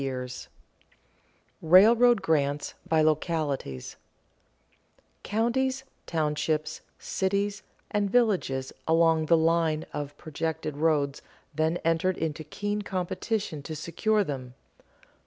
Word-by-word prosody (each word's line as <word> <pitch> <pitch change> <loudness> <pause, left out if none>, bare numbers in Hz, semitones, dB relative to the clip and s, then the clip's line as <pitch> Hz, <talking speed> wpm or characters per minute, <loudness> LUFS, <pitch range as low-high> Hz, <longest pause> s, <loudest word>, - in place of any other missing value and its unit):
[Sidenote: 130 -2 -5 1.1
Railroad 220 +7 +6
grants 145 -4 0 0.2
by 160 -1 +4
localities] 155 - -1 1.2
Counties, 260 +5 0 0.2
townships, 155 -1 -1 0.2
cities, 200 +2 -1 0.3
and 205 -1 +1
villages 190 - +1
along 165 -1 +3
the 165 - +5
line 160 -1 +2
of 145 -1 -5
projected 160 -1 -4
roads 150 -3 +1 0.3
then 160 +3 +1
entered 165 +3 +1
into 160 -1 -3
keen 205 +7 -3
competition 185 -2 -3
to 155 +3 -6
secure 205 +8 0
them. 130 -6 -6
160 Hz, 95 wpm, -27 LUFS, 150-200 Hz, 1.2 s, Railroad